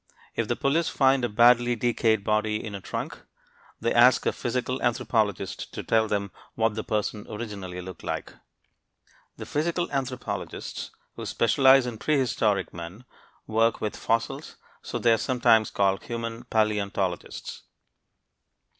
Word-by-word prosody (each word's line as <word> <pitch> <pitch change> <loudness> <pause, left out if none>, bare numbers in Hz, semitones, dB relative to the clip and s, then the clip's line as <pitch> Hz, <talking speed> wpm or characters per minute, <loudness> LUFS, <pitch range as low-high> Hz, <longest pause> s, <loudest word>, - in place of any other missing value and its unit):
If - - -1
the - - 0
police 160 +5 +1
find 135 -1 +3
a 120 - +1
badly 120 +2 +5
decayed 115 -2 +1
body 105 0 +1
in 110 - -6
a 100 - -6
trunk, - - -5 0.6
they 115 - 0
ask 120 +2 +5
a - - +3
physical 125 +1 -2
anthropologist 110 -5 -1
to - - -4
tell 110 -1 +2
them 100 -2 -2 0.2
what 110 -1 +1
the 110 0 -4
person 105 -1 -2
originally 100 -5 -6
looked 90 -1 -9
like. - - -4 1.0
The - - -7
physical 170 +3 -1
anthropologists 130 -3 -4 0.3
who - - -6
specialize 130 +3 +5
in 120 -3 -5
prehistoric 115 -9 +1
men 85 +8 -8 0.4
work 115 +1 +2
with 105 - -3
fossils, 115 0 -2 0.3
so - - -4
they 115 -1 +4
are - - +3
sometimes 115 -2 +3
called 95 -1 +1
human 115 -1 -5
paleontologists. 100 -4 -1
115 Hz, 135 wpm, -26 LUFS, 105-125 Hz, 1.0 s, badly